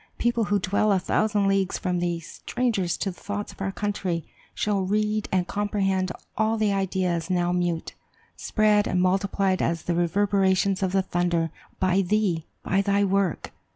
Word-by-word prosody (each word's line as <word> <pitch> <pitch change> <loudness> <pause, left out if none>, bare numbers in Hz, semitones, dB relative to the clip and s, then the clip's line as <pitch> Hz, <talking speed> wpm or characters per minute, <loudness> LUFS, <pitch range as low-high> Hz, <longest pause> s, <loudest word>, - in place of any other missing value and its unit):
People 235 -2 +1
who 205 0 +2
dwell 200 +3 +1
a 195 - +4
thousand 205 +2 +1
leagues 195 -1 +1
from 180 -1 -1
thee, 175 -1 -1
strangers 195 +1 -2
to 195 - -2
the 180 - -15
thoughts 205 0 -4
of - - -14
our 195 0 -1
country, 190 -5 -2 0.3
shall 205 -2 0
read 210 +2 0
and 185 -1 +1
comprehend 195 -2 0 0.2
all 220 +1 +1
the 215 -2 +2
ideas 185 -3 -1
now 175 -1 +1
mute, 175 -2 -1 0.4
spread 210 -1 +2
and 180 - 0
multiplied 190 +1 +1
as 165 -1 0
the 175 - -1
reverberations 190 +2 +2
of 190 -2 +1
the 190 0 +2
thunder, 175 -3 0 0.3
by 185 +1 +3
thee, 185 -4 0 0.2
by 195 +1 +2
thy 200 0 +2
work. 195 -4 0
195 Hz, 165 wpm, -25 LUFS, 180-205 Hz, 0.4 s, a